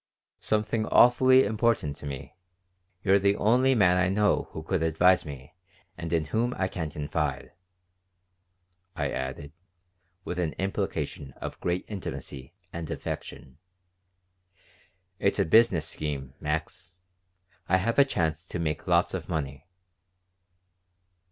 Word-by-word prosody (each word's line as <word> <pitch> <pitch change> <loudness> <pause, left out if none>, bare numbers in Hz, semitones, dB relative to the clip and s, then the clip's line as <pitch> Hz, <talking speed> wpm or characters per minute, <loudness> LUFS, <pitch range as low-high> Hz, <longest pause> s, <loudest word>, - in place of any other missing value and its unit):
"Something 110 +1 0
awfully 130 +2 +6
important 110 - 0
to 75 - -8
me. 70 -1 -7 0.7
You're 100 0 +4
the 100 +1 +2
only 125 +6 +3
man 90 -5 +4
I 90 0 +2
know 105 +2 +2
who 80 - -7
could 90 +1 -1
advise 85 +3 +3
me 70 -1 -9 0.4
and 85 -1 -6
in 80 -2 +1
whom 115 +9 -1
I 95 - +1
can 80 -4 -4
confide," 75 -1 -3 1.4
I 70 -2 -1
added, 65 +2 -5 0.7
with 90 - -4
an 80 -3 -1
implication 95 -7 -3
of - - -7
great 90 +1 -1
intimacy 80 -7 -7 0.2
and 85 -2 -5
affection. 65 - -6 1.6
"It's - - +1
a - - +2
business 90 -4 +4
scheme, 70 -5 -4
Max. 80 +4 -4 0.7
I 95 - +5
have 115 +8 0
a - - +9
chance 85 - -1
to - - -4
make 80 -1 -3
lots 85 -1 +3
of 90 -2 -5
money." 75 -1 -4
85 Hz, 125 wpm, -27 LUFS, 75-100 Hz, 1.6 s, a